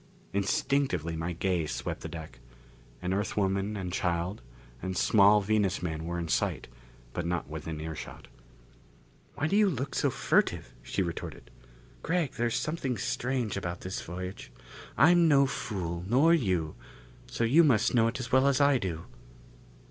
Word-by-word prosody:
Instinctively 100 - 0
my 80 +2 -3
gaze 85 -3 -1
swept - - -4
the 80 - -6
deck. 80 -6 -9 0.6
An 90 +1 0
Earth 100 +2 -2
woman 100 +1 0
and 90 -2 -4
child 90 +1 -1 0.4
and 95 +1 -3
a - - -3
small 105 +1 +5
Venus 100 -2 +1
man 80 -2 -3
were 85 +1 -3
in 85 -1 -3
sight, - - 0 0.5
but 90 - -2
not 85 -1 -2
within 80 +1 -6
earshot. 80 0 -7 1.1
"Why 145 - -1
do 185 - +1
you 210 -1 +5
look 135 -4 -3
so - - +2
furtive?" - - 0
she 95 +10 -1
retorted. 85 -2 -6 0.5
"Gregg, 165 -4 0
there's 120 -1 -1
something 145 -6 -2
strange 125 +1 -1
about 90 -3 -4
this 95 +1 -4
voyage. 90 +3 -7 0.5
I'm 170 +6 +6
no 140 -3 +5
fool, 90 -9 -4
nor 140 - +5
you, 90 - +1 0.5
so - - -2
you 140 +9 +6
must 120 -9 +3
know 115 -2 +4
it 115 - -3
as 125 -1 -5
well 130 +1 +5
as 140 -2 +3
I 140 -2 +4
do." 85 -5 -4
100 Hz, 160 wpm, -29 LUFS, 85-130 Hz, 1.1 s, I'm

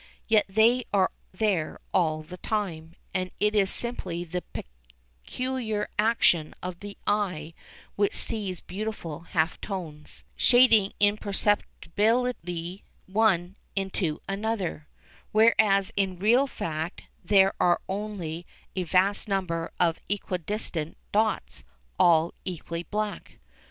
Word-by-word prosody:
Yet 220 -2 +4
they 230 +5 +4
are 195 -2 +3 0.2
there 185 -5 0
all 155 -3 +2
the 180 +4 -10
time, 170 -7 -3 0.2
and 185 -1 -1
it 210 0 +3
is 200 -3 +3
simply 190 -9 -1
the 180 +1 -4 0.8
peculiar 245 - -2
action 210 -8 +3
of 180 -1 -5
the 205 0 -8
eye 180 -7 0 0.4
which 205 -1 +1
sees 200 -6 -1
beautiful 190 -5 -5
half 165 -1 -1
tones, 165 -7 -6
shading 230 -5 +5
imperceptibly 205 -2 0 0.2
one 190 -3 +2 0.2
into 190 -5 -1
another, 195 -6 -2 0.4
whereas 215 -3 +4
in 190 -2 0
real 235 +9 +4
fact 160 - -4 0.2
there 195 -1 +5
are 175 -1 +4
only 190 -5 -4 0.3
a 185 - 0
vast 190 +5 +2
number 180 -5 -1
of 170 -2 +2
equidistant 180 -4 -2
dots, 215 0 0 0.4
all 165 0 +5
equally 170 -2 -4
black. 210 +3 -4
195 Hz, 110 wpm, -27 LUFS, 170-215 Hz, 0.8 s, shading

